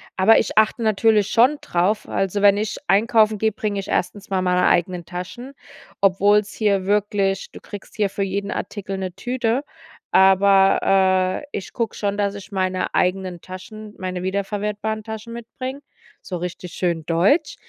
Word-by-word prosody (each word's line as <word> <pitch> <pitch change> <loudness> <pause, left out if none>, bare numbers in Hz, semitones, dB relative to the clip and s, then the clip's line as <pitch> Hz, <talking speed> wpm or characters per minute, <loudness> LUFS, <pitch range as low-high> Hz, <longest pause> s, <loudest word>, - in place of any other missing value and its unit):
aber 205 +4 +5
ich - - -3
achte 220 +2 +3
natürlich 215 -1 +3
schon 255 +6 +4
drauf, 185 +5 0
also, 195 +1 -1
wenn 200 0 +5
ich 215 +1 -2
einkaufen 215 +1 +3
gehe, 220 +2 +1
bringe 205 -1 -3
ich 195 - -7
1. 190 +3 -2
mal 190 -1 +1
meine 180 0 +2
eigenen 175 0 +1
Taschen, 190 +10 -7 0.5
obwohl's 200 +2 +3
hier 200 -3 +1
wirklich 200 -1 0
du - - -11
kriegst 205 -2 -11
hier 205 -2 +1
für 200 - -3
jeden 200 +1 -3
Artikel 195 -1 -5
'ne 185 -2 -4
Tüte, 245 +1 -1 0.5
aber, 190 -1 +4
äh, - - -12
ich 195 - -8
gucke 230 -2 -2
schon, 200 -1 -2
dass 200 -1 0
ich 200 +1 -10
meine 185 -1 -1
eigenen 180 -1 0
Taschen, 210 +3 -10
meine 185 -1 -4
wiederverwertbaren 210 +3 -3
Taschen 220 +1 -7
mitbringe, 255 +4 -7 0.4
so 180 - -5
richtig 180 0 -6
schön 170 -3 -2
deutsch. 190 - +2
200 Hz, 160 wpm, -21 LUFS, 185-215 Hz, 0.5 s, aber